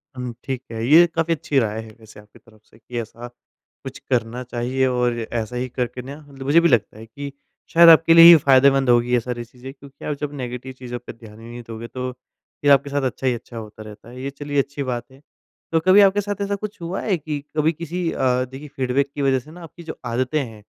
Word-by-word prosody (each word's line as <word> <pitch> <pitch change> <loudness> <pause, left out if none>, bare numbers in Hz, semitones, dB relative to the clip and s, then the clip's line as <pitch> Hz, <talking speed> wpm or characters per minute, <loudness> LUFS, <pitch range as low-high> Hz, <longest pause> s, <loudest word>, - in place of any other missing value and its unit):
हुँ, 125 -2 -5
ठीक 130 -1 -4
है। 115 0 -4
ये 165 +4 +7
काफ़ी 165 0 +1
अच्छी 145 -3 0
राय 110 -1 -2
है 110 - -12
वैसे 110 -1 -15
आपकी 105 0 -19
तरफ 110 -1 -23
से - - -23
कि 120 +1 -6
ऐसा 115 +2 -10 0.6
कुछ 135 +1 -8
करना 120 0 -1
चाहिए 125 +2 -1
और 125 -2 0
ऐसा 115 +1 -4
ही 125 +1 -2
करके 125 0 -4
ना 140 +3 -9
मतलब 135 -1 -11
मुझे 150 +4 +5
भी 170 - +3
लगता 110 -3 +1
है 110 - -10
कि 140 +5 -8 0.4
शायद 170 0 +8
आपके 165 0 +7
लिए 165 0 +9
ये 170 - +11
फायदेमंद 135 0 +5
होंगी 120 0 +3
ये 120 - +4
सारी 120 0 -5
चीज़ें। 125 +3 -11
क्योंकि 140 0 -14
आप 150 - -2
जब 145 -1 -3
नेगेटिव 125 +1 -6
चीज़ों 125 -1 -7
पे 125 - -10
ध्यान 110 -1 -15
ही 115 - -13
नहीं 120 +1 -9
दोगे 115 +1 -7
तो 130 +1 -5
फ़िर 135 +3 -4
आपके 140 +1 +4
साथ 145 0 -1
अच्छा 130 - -5
ही 125 - +3
अच्छा 120 0 -9
होता 110 0 -9
रहता 110 +2 -13
है, 125 +1 -10
ये 135 - -3
चलिए 145 0 -3
अच्छी 140 +1 -6
बात 120 -2 -3
है। 135 +2 -18 0.5
तो 165 - +3
कभी 185 +4 +6
आपके 200 +1 +4
साथ 205 0 -5
ऐसा 200 0 -1
कुछ 205 -3 -8
हुआ 175 +3 -4
है 195 -5 0
कि 150 -1 -5 0.2
कभी 155 +2 +3
किसी 170 +2 -4
अ, 125 -1 +1
देखिए 135 +4 -10
फीडबैक 135 +1 0
की 145 - -3
वजह 135 -1 +2
से 150 +5 -15
ना 175 0 -12
आपकी 165 +2 -12
जो 165 - -8
आदतें 125 +5 -1
हैं, 110 -3 -11
130 Hz, 245 wpm, -21 LUFS, 120-145 Hz, 0.6 s, ये